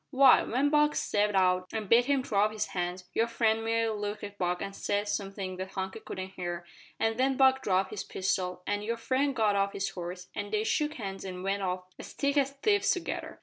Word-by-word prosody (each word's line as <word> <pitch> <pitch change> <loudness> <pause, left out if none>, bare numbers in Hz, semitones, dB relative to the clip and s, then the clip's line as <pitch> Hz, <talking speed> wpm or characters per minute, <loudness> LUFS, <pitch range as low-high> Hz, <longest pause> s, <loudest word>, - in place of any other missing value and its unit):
"Why, 270 -2 +7
when 275 +5 +1
Buck 300 0 +4
stepped 210 0 +1
out 185 -1 +2
an' 220 -1 -2
bid 230 +4 +5
him 275 -1 +1
throw 205 -5 +2
up 215 - -1
his 215 -1 -2
hands, 180 0 -2
your 230 - +2
friend 225 -1 +1
merely 225 -1 +1
looked 210 0 -4
at 205 0 -8
Buck 180 0 0
and 195 0 -5
said 205 +1 -1
somethin' 195 -2 -3
that 190 +1 -6
Hunky 190 +3 -4
couldn't 185 -3 -6
hear, 175 -2 -5 0.3
an 225 0 +1
then 265 +1 +2
Buck 265 0 +5
dropped 190 -5 +1
his 210 - -4
pistol, 185 -1 -2
and 205 0 -1
your 230 +2 -2
friend 265 +4 0
got 215 -4 +2
off 200 0 +1
his 195 0 -2
horse, 180 0 -7
and 205 -1 -5
they 215 0 +1
shook 300 +7 0
hands 195 -4 -5
and 185 -1 -6
went 195 +1 -1
off 185 -1 -2 0.2
as - - -9
thick 280 0 0
as 275 -2 +3
thieves 410 +10 +1
together. 365 - -2
205 Hz, 225 wpm, -29 LUFS, 190-240 Hz, 0.3 s, Why